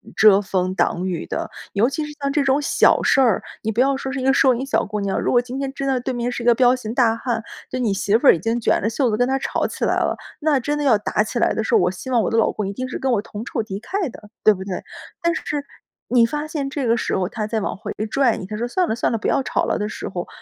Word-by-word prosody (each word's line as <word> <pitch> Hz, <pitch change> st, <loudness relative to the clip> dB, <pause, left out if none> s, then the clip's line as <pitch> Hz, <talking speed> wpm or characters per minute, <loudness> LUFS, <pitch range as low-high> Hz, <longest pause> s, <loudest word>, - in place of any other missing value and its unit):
遮 205 Hz, -1 st, +6 dB
风 185 Hz, -2 st, -1 dB
挡 180 Hz, -1 st, 0 dB
雨 180 Hz, -3 st, -3 dB
的。 -, -, -4 dB, 0.2 s
尤 215 Hz, +5 st, +3 dB
其 300 Hz, +3 st, -3 dB
是 300 Hz, -, -8 dB
像 280 Hz, 0 st, 0 dB
这 290 Hz, 0 st, +1 dB
种 270 Hz, +1 st, +2 dB
小 -, -, +3 dB
事 -, -, +3 dB
儿， 240 Hz, -7 st, +3 dB, 0.2 s
你 220 Hz, -, 0 dB
不 225 Hz, +3 st, +1 dB
要 270 Hz, +1 st, +2 dB
说 265 Hz, 0 st, -4 dB
是 265 Hz, -, -3 dB
一 -, -, -4 dB
个 265 Hz, -, +4 dB
收 265 Hz, -2 st, +5 dB
银 255 Hz, +3 st, -3 dB
小 275 Hz, -, 0 dB
姑 210 Hz, 0 st, -4 dB
娘， 200 Hz, -1 st, -1 dB
如 -, -, 0 dB
果 245 Hz, -, +4 dB
今 250 Hz, +1 st, -7 dB
天 275 Hz, -1 st, -2 dB
真 275 Hz, -, -4 dB
的 265 Hz, -2 st, +1 dB
对 255 Hz, +1 st, -3 dB
面 240 Hz, 0 st, -2 dB
是 240 Hz, -, -4 dB
一 -, -, -6 dB
个 240 Hz, -, +6 dB
彪 245 Hz, 0 st, +5 dB
形 225 Hz, -3 st, -6 dB
大 235 Hz, -3 st, +3 dB
汉， 230 Hz, -1 st, -2 dB, 0.3 s
对 255 Hz, -, -3 dB
你 230 Hz, -5 st, +1 dB
媳 200 Hz, +2 st, +1 dB
妇 270 Hz, -, +1 dB
儿 -, -, +11 dB
已 -, -, -5 dB
经 225 Hz, +7 st, -1 dB
卷 -, -, +2 dB
着 220 Hz, -, 0 dB
袖 245 Hz, +2 st, +1 dB
子 215 Hz, -, 0 dB
跟 245 Hz, +1 st, +2 dB
他 265 Hz, +1 st, +1 dB
吵 -, -, -1 dB
起 -, -, -6 dB
来 -, -, +2 dB
了， -, -, 0 dB, 0.2 s
那 300 Hz, -3 st, +2 dB
真 290 Hz, +4 st, -2 dB
的 295 Hz, -, -2 dB
要 255 Hz, -7 st, +4 dB
打 210 Hz, 0 st, 0 dB
起 235 Hz, +3 st, -3 dB
来 -, -, +2 dB
的 220 Hz, -, -1 dB
时 -, -, -2 dB
候， -, -, +5 dB
我 180 Hz, -, +2 dB
希 190 Hz, +8 st, -8 dB
望 245 Hz, -3 st, +3 dB
我 -, -, 0 dB
的 225 Hz, -, +1 dB
老 225 Hz, -, +3 dB
公 210 Hz, -, -3 dB
一 -, -, -3 dB
定 255 Hz, +5 st, -4 dB
是 255 Hz, -, -5 dB
跟 265 Hz, -, 0 dB
我 220 Hz, -4 st, +2 dB
同 210 Hz, 0 st, -8 dB
仇 235 Hz, -, -2 dB
敌 200 Hz, -2 st, -6 dB
忾 380 Hz, -, -2 dB
的， 210 Hz, -, -13 dB
对 215 Hz, -, +7 dB
不 190 Hz, -1 st, -7 dB
对？ 190 Hz, -2 st, -5 dB, 0.4 s
但 340 Hz, -1 st, +2 dB
是 290 Hz, -1 st, -3 dB, 0.4 s
你 245 Hz, -1 st, +4 dB
发 295 Hz, +5 st, -3 dB
现 290 Hz, -3 st, -3 dB
这 275 Hz, -1 st, -3 dB
个 230 Hz, 0 st, +3 dB
时 -, -, -1 dB
候 185 Hz, -1 st, 0 dB
他 215 Hz, +1 st, -4 dB
在 220 Hz, 0 st, -1 dB
往 -, -, -2 dB
回 -, -, -7 dB, 0.2 s
拽 270 Hz, -3 st, +2 dB
你， -, -, -6 dB
他 210 Hz, +3 st, -6 dB
说： 235 Hz, +2 st, -2 dB
“算 360 Hz, +7 st, +1 dB
了， -, -, 0 dB
算 -, -, 0 dB
了， 230 Hz, -, 0 dB
不 220 Hz, -, -3 dB
要 275 Hz, -, +2 dB
吵 -, -, -1 dB
了” -, -, 0 dB
的 210 Hz, 0 st, -2 dB
时 -, -, -6 dB
候， 175 Hz, -2 st, -5 dB
240 Hz, 340 characters per minute, -21 LUFS, 210-270 Hz, 0.4 s, 儿